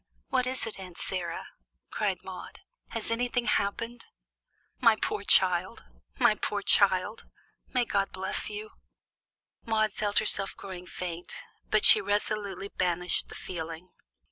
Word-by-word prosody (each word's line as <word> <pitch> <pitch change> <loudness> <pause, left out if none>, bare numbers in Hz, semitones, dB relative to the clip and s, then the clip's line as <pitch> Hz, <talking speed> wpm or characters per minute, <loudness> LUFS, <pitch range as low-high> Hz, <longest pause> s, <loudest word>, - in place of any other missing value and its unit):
"What 255 -1 +2
is 260 0 -2
it, 220 -3 -6
Aunt 180 -3 -9
Sarah?" 175 -3 -3 0.5
cried - - -1
Maude. - - -9 0.3
"Has 230 0 -4
anything 245 +1 0
happened?" 230 +4 -1 0.7
"My 230 -4 +6
poor 205 - -2
child! 185 -2 +4 0.3
My - - +5
poor 205 -1 -3
child! 195 +1 +3 0.4
May 250 -2 +1
God 200 -3 +1
help 190 +2 -2
you!" 215 +1 -6 0.9
Maude 215 -2 +1
felt 205 0 -1
herself 195 -2 +2
growing 185 -2 -8
faint, 175 -1 -6 0.3
but 215 -1 +3
she 215 - +9
resolutely 205 -1 -1
banished 180 -1 0
the - - -9
feeling. 165 0 -6
200 Hz, 130 wpm, -29 LUFS, 185-215 Hz, 0.9 s, she